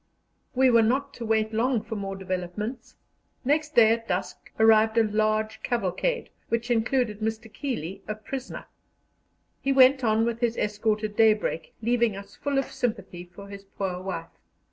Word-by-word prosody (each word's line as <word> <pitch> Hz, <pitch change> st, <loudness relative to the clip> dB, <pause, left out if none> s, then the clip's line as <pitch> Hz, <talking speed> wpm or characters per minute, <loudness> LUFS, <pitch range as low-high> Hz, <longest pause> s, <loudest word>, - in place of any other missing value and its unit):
We 260 Hz, 0 st, +5 dB
were 230 Hz, -1 st, +6 dB
not 270 Hz, +5 st, +1 dB
to 235 Hz, -, -7 dB
wait 220 Hz, 0 st, +1 dB
long 230 Hz, 0 st, +1 dB
for 220 Hz, 0 st, -6 dB
more 195 Hz, -1 st, -4 dB
developments. 190 Hz, +5 st, -5 dB, 0.5 s
Next 300 Hz, +2 st, +1 dB
day 225 Hz, -2 st, +7 dB
at 230 Hz, 0 st, -1 dB
dusk 180 Hz, +2 st, -4 dB
arrived 220 Hz, 0 st, +5 dB
a 230 Hz, -, +6 dB
large 215 Hz, +1 st, 0 dB
cavalcade, 240 Hz, -, -1 dB, 0.2 s
which 230 Hz, +1 st, -1 dB
included 230 Hz, -2 st, +1 dB
Mr. 220 Hz, 0 st, -4 dB
Keeley, 200 Hz, -, -4 dB
a 215 Hz, -, -3 dB
prisoner. 255 Hz, +4 st, -7 dB, 1.0 s
He 275 Hz, -, 0 dB
went 265 Hz, 0 st, +6 dB
on 220 Hz, 0 st, +3 dB
with 235 Hz, -1 st, -2 dB
his 235 Hz, -1 st, 0 dB
escort 210 Hz, +1 st, 0 dB
at 210 Hz, -1 st, -3 dB
daybreak, 215 Hz, -7 st, +2 dB
leaving 235 Hz, -2 st, +2 dB
us 200 Hz, 0 st, -11 dB
full 285 Hz, -1 st, -2 dB
of 270 Hz, -, -1 dB
sympathy 200 Hz, -7 st, -3 dB
for 180 Hz, +3 st, -12 dB
his 200 Hz, 0 st, -10 dB
poor 190 Hz, -2 st, -4 dB
wife. 170 Hz, -3 st, -5 dB
220 Hz, 165 wpm, -26 LUFS, 205-240 Hz, 1.0 s, day